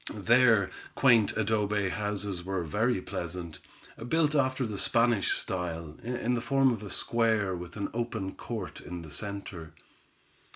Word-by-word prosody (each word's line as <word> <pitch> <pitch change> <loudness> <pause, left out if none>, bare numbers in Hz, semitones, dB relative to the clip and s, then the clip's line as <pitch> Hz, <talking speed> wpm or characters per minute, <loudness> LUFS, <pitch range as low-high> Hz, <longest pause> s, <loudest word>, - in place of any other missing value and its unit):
Their 115 -1 +4 0.2
quaint 115 -6 +4
adobe 105 -2 +1
houses 100 -2 -3
were 95 -1 -2
very 105 +5 0
pleasant, 85 -3 -5 0.5
built 155 -1 +3
after 130 -2 +2
the 105 -3 -4
Spanish 115 -3 +2
style, 85 -4 -4
in 125 0 -1
the 120 - 0
form 135 0 +3
of 110 - -5
a 105 - -7
square 110 -5 +1
with 90 +3 -8
an 100 - -1
open 115 -5 -3
court 110 -6 -6
in 90 -1 -6
the 80 - -11
center. 100 -3 -6
105 Hz, 140 wpm, -29 LUFS, 90-120 Hz, 0.5 s, Their